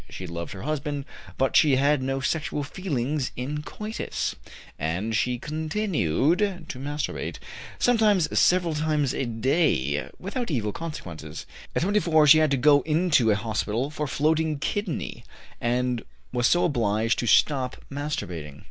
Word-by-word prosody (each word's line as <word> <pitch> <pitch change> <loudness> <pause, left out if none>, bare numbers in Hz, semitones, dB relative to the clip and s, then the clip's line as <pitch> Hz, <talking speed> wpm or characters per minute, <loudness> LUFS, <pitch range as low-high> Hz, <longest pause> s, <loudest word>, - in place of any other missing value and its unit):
She 95 - -7
loved 85 +1 -5
her 95 - -8
husband, 145 -1 -2 0.3
but 135 0 +1
she 145 -3 +6
had 140 +1 +3
no 135 +1 -1
sexual 150 +1 -1
feelings 145 -4 -2
in 145 +4 -3
coitus, 215 +7 -4 0.4
and 90 +9 -1
she 125 +2 +1
continued 155 - 0 0.3
to 130 - -6
masturbate, 145 +2 -3 0.4
sometimes 215 -8 +3
several 175 -2 +3
times 150 -3 0
a 135 - -1
day, 115 - +1
without 235 +6 -4
evil 115 -9 -1
consequences. 85 - -7 0.3
At - - +1
24 170 -6 +3
she 155 +2 +8
had 155 -1 +3
to 140 - +2
go 145 +2 +5
into 155 -5 +2
a 105 - +4
hospital 110 +4 -2
for 150 -1 -3
floating 155 +2 +1
kidney, 185 +5 -3 0.4
and 125 0 0 0.3
was 120 -1 +3
so 175 - +3
obliged 115 -5 +1
to 120 - -1
stop 130 +2 +3
masturbating. 90 - -4
140 Hz, 140 wpm, -26 LUFS, 120-155 Hz, 0.4 s, she